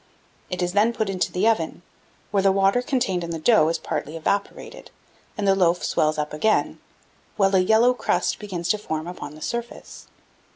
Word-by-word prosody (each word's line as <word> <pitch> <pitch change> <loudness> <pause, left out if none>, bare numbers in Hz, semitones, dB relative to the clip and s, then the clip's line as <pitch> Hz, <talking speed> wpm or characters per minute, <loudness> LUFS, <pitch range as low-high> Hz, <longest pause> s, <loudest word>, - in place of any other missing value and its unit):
It 180 -1 -2
is 175 0 -2
then 215 +4 +3
put 215 -3 -2
into 185 -2 -1
the 185 +5 +1
oven, 175 -6 0 0.5
where 200 -1 +2
the 195 0 +4
water 195 +5 +2
contained 245 - -1
in 170 - -5
the 165 - -3
dough 160 -1 +4
is 165 - 0
partly 155 +3 -4
evaporated, 200 - -3 0.5
and 205 -1 -1
the 195 - +5
loaves 180 -2 +1
swell 155 - +2
up 150 0 -3
again, 215 +8 +1 0.6
while 195 -1 +2
a - - +5
yellow 220 +6 +4
crust 180 -7 -1
begins 185 -5 -5
to 210 - +2
form 160 -5 -4
upon 170 -4 -8
the 155 - -10
surface. 235 0 -6
195 Hz, 190 wpm, -23 LUFS, 170-215 Hz, 0.6 s, the